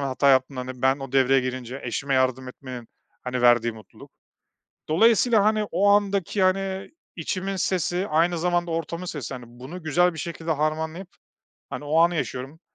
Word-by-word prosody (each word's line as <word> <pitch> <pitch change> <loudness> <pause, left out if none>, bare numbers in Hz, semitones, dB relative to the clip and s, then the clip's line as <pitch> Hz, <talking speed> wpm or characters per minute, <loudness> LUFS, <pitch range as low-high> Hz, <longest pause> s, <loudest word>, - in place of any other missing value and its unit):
hata 140 0 +1
yaptığında, 130 0 +2
hani, 125 0 -8
ben, 135 +1 +3
o 135 -1 -8
devreye 135 0 +4
girince 130 +1 -5
eşime 135 +4 -2
yardım 130 0 +1
etmenin, 125 -2 -9 0.3
hani, 125 -1 -3
verdiği 120 -1 +4
mutluluk. 110 -1 -15 0.8
Dolayısıyla, 225 +5 +4
hani, 215 0 +2
o 195 +4 +3
andaki, 200 -1 +2
hani, 190 +1 0 0.3
içimin 190 +3 -3
sesi, 180 +1 0
aynı 170 +2 +2
zamanda 175 0 0
ortamın 165 +2 -3
sesi. 140 -6 -5
Hani, 125 -1 -8
bunu 130 +9 -10
güzel 175 +3 +2
bir 160 - -9
şekilde 165 +1 -5
harmanlayıp, 160 +4 -2 0.6
hani, 145 - -6
o 155 +3 +1
anı 170 +1 +4
yaşıyorum 135 +2 -4
155 Hz, 160 wpm, -24 LUFS, 130-180 Hz, 0.8 s, devreye